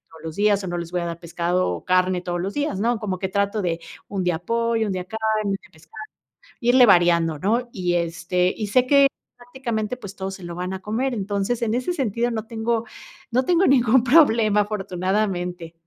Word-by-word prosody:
todos 160 Hz, -1 st, -15 dB
los 160 Hz, -1 st, -6 dB
días 205 Hz, -1 st, +2 dB
o -, -, -4 dB
no 175 Hz, 0 st, -3 dB
les 170 Hz, -1 st, -6 dB
voy 180 Hz, -, 0 dB
a -, -, -3 dB
dar 170 Hz, 0 st, -5 dB
pescado 175 Hz, +2 st, -1 dB
o -, -, -4 dB
carne 185 Hz, 0 st, +2 dB
todos 175 Hz, -1 st, -3 dB
los 195 Hz, +3 st, -3 dB
días, 290 Hz, -10 st, -2 dB
¿no? 235 Hz, +1 st, +1 dB
Como 195 Hz, -4 st, -3 dB
que 190 Hz, 0 st, -2 dB
trato 200 Hz, +2 st, 0 dB
de, 170 Hz, -2 st, -1 dB, 0.3 s
un 195 Hz, -2 st, -3 dB
día 175 Hz, -2 st, 0 dB
pollo, 230 Hz, +3 st, 0 dB
un 200 Hz, -, -2 dB
día 185 Hz, -1 st, -3 dB
carne, 220 Hz, +2 st, -1 dB
un 195 Hz, -, 0 dB
día -, -, -20 dB
pescado, 165 Hz, +7 st, -12 dB, 0.6 s
irle 245 Hz, +1 st, +6 dB
variando, 170 Hz, -4 st, +4 dB
¿no? 235 Hz, +8 st, 0 dB
Y, 180 Hz, -3 st, -1 dB
este, 175 Hz, +2 st, 0 dB
y 215 Hz, -2 st, -3 dB
sé 250 Hz, +5 st, +2 dB
que, 280 Hz, 0 st, +6 dB, 0.3 s
prácticamente, 245 Hz, -2 st, -4 dB
pues, 200 Hz, -5 st, -9 dB
todos 190 Hz, 0 st, -4 dB
se 190 Hz, -, -13 dB
lo 175 Hz, 0 st, -6 dB
van 180 Hz, +2 st, -4 dB
a 190 Hz, -, -6 dB
comer. 245 Hz, +5 st, -1 dB
Entonces, 205 Hz, +2 st, -2 dB
en 225 Hz, -1 st, 0 dB
ese 255 Hz, +8 st, -1 dB
sentido, 240 Hz, -, -1 dB
no 220 Hz, -1 st, -3 dB
tengo 230 Hz, 0 st, -1 dB, 0.5 s
no 255 Hz, +2 st, +1 dB
tengo 355 Hz, +2 st, +3 dB
ningún 250 Hz, -2 st, +4 dB
problema, 230 Hz, -7 st, +5 dB
afortunadamente. 185 Hz, -3 st, -2 dB
200 Hz, 210 wpm, -23 LUFS, 180-230 Hz, 0.6 s, irle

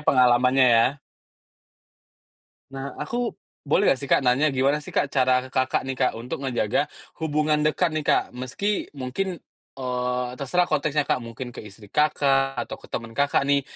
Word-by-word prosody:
pengalamannya 125 Hz, -1 st, +4 dB
ya? 120 Hz, +4 st, +4 dB, 1.8 s
Nah, 135 Hz, 0 st, -5 dB
aku 240 Hz, 0 st, -2 dB, 0.4 s
boleh 145 Hz, -, +3 dB
nggak 135 Hz, -, +2 dB
sih 140 Hz, -, -6 dB
Kak -, -, +4 dB
nanya, 135 Hz, +5 st, +3 dB
gimana 135 Hz, +2 st, +2 dB
sih -, -, -9 dB
Kak -, -, +2 dB
cara 130 Hz, -1 st, +2 dB
ke -, -, -15 dB
Kakak 130 Hz, 0 st, +1 dB
nih 135 Hz, -, -2 dB
Kak 130 Hz, -, +2 dB
untuk 125 Hz, +4 st, -6 dB
ngejaga 125 Hz, 0 st, 0 dB, 0.4 s
hubungan 150 Hz, -1 st, +1 dB
dekat 155 Hz, +3 st, +2 dB
nih 155 Hz, -, -1 dB
Kak, -, -, +4 dB
meski 130 Hz, -, -2 dB
mungkin, 155 Hz, +8 st, -3 dB, 0.4 s
eee, 125 Hz, -1 st, -2 dB
terserah 175 Hz, +6 st, +1 dB
konteksnya 150 Hz, 0 st, +1 dB
Kak, -, -, +1 dB
mungkin 115 Hz, +2 st, -7 dB
ke -, -, -8 dB
istri 105 Hz, +1 st, -13 dB
Kakak 135 Hz, -2 st, +2 dB
atau -, -, -6 dB
ke -, -, -15 dB
temen 115 Hz, -1 st, -4 dB
Kakak 140 Hz, +2 st, +2 dB
nih 140 Hz, 0 st, +3 dB
135 Hz, 165 wpm, -24 LUFS, 125-150 Hz, 1.8 s, pengalamannya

